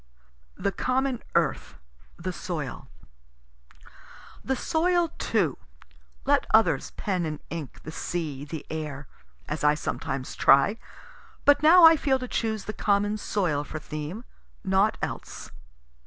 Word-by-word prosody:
THE 200 Hz, -, 0 dB
COMMON 255 Hz, +4 st, -1 dB
EARTH, -, -, 0 dB, 0.4 s
THE -, -, -4 dB
SOIL -, -, -5 dB, 1.6 s
The 265 Hz, -, 0 dB
soil, 340 Hz, +4 st, +1 dB
too 180 Hz, -, 0 dB, 0.7 s
let -, -, +2 dB
others -, -, +3 dB
pen 185 Hz, -4 st, -1 dB
and 155 Hz, -2 st, -3 dB
ink 160 Hz, -5 st, -7 dB
the 155 Hz, -, -7 dB
sea, 155 Hz, -5 st, -4 dB
the 150 Hz, +1 st, -7 dB
air, 150 Hz, -3 st, -5 dB, 0.4 s
(as -, -, -4 dB
I 150 Hz, 0 st, +5 dB
sometimes 135 Hz, -3 st, -4 dB
try) 140 Hz, +11 st, +4 dB, 0.7 s
but 285 Hz, 0 st, +6 dB
now 335 Hz, +3 st, +7 dB
I 325 Hz, 0 st, +8 dB
feel 270 Hz, -2 st, +2 dB
to 255 Hz, -1 st, -6 dB
choose 220 Hz, -3 st, -2 dB
the 215 Hz, -, -4 dB
common 205 Hz, 0 st, +1 dB
soil 175 Hz, -10 st, 0 dB
for 155 Hz, -, -7 dB
theme 155 Hz, +8 st, -6 dB, 0.4 s
naught 195 Hz, +3 st, +2 dB
else. -, -, -6 dB
195 Hz, 125 wpm, -26 LUFS, 150-255 Hz, 1.6 s, I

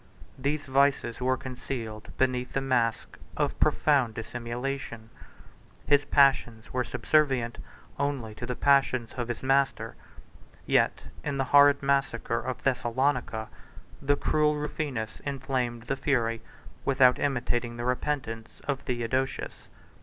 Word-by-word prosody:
These 145 Hz, +3 st, -1 dB
vices 135 Hz, -3 st, +2 dB
were 130 Hz, +1 st, +2 dB
concealed 125 Hz, -4 st, -6 dB
beneath 125 Hz, -1 st, 0 dB
the -, -, +1 dB
mask 125 Hz, -4 st, 0 dB, 0.2 s
of -, -, -1 dB
profound 135 Hz, -7 st, +3 dB
dissimulation; 120 Hz, 0 st, -5 dB
4 -, -, -24 dB, 0.7 s
his 145 Hz, 0 st, +5 dB
passions 135 Hz, -6 st, +3 dB
were 125 Hz, 0 st, +1 dB
subservient 130 Hz, -4 st, +1 dB, 0.4 s
only 140 Hz, -6 st, -2 dB
to 120 Hz, +3 st, -7 dB
the 125 Hz, -, -2 dB
passions 135 Hz, -4 st, +2 dB
of 120 Hz, -2 st, -3 dB
his 120 Hz, 0 st, -5 dB
master; 135 Hz, 0 st, +1 dB, 0.7 s
yet -, -, +2 dB, 0.2 s
in 140 Hz, -2 st, -2 dB
the 135 Hz, -, +1 dB
horrid 145 Hz, 0 st, +7 dB
massacre 135 Hz, -4 st, +1 dB
of 130 Hz, +2 st, -5 dB
Thessalonica, 125 Hz, -3 st, 0 dB, 0.5 s
the 145 Hz, +1 st, +2 dB
cruel 150 Hz, 0 st, +2 dB
Rufinus 145 Hz, -6 st, -4 dB
inflamed 130 Hz, -4 st, -2 dB
the 130 Hz, +3 st, -2 dB
fury, 115 Hz, -5 st, 0 dB, 0.4 s
without 130 Hz, -2 st, +4 dB
imitating 120 Hz, -3 st, -1 dB
the 120 Hz, -, -4 dB
repentance, 125 Hz, -3 st, -3 dB
of 140 Hz, -2 st, 0 dB
Theodosius. 130 Hz, +1 st, -3 dB
130 Hz, 125 wpm, -28 LUFS, 120-140 Hz, 0.7 s, horrid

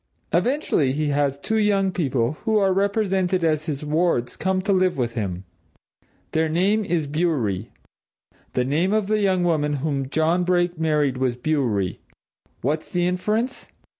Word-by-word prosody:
Eventually 245 Hz, -, +1 dB
he 150 Hz, +1 st, -1 dB
has 140 Hz, -1 st, +1 dB
two 220 Hz, +10 st, -1 dB
young 200 Hz, -2 st, +2 dB
people, 135 Hz, -9 st, 0 dB
who 220 Hz, -1 st, +2 dB
are 195 Hz, -2 st, +3 dB
represented 195 Hz, -2 st, +1 dB
as 155 Hz, -1 st, +1 dB
his 150 Hz, -1 st, -3 dB
wards, 155 Hz, -5 st, 0 dB
come 190 Hz, 0 st, 0 dB
to 200 Hz, 0 st, +1 dB
live 185 Hz, -3 st, +2 dB
with 120 Hz, -2 st, -1 dB
him. 95 Hz, -5 st, -3 dB, 0.9 s
Their 160 Hz, 0 st, +1 dB
name 195 Hz, +7 st, +2 dB
is 175 Hz, -6 st, -1 dB
Bewery. 140 Hz, -, -1 dB, 0.8 s
The 125 Hz, -, +1 dB
name 165 Hz, +9 st, +1 dB
of 215 Hz, -2 st, +2 dB
the 215 Hz, +1 st, +1 dB
young 190 Hz, -3 st, +2 dB
woman 150 Hz, -4 st, +1 dB
whom 140 Hz, -2 st, -2 dB
John 160 Hz, +4 st, +1 dB
Brake 175 Hz, -1 st, +1 dB
married 150 Hz, -5 st, +1 dB
was 130 Hz, -2 st, 0 dB
Bewery. 120 Hz, -, -1 dB, 0.6 s
What's 150 Hz, +5 st, -2 dB
the 175 Hz, -1 st, 0 dB
inference? 210 Hz, +8 st, -1 dB
160 Hz, 155 wpm, -23 LUFS, 140-190 Hz, 0.9 s, are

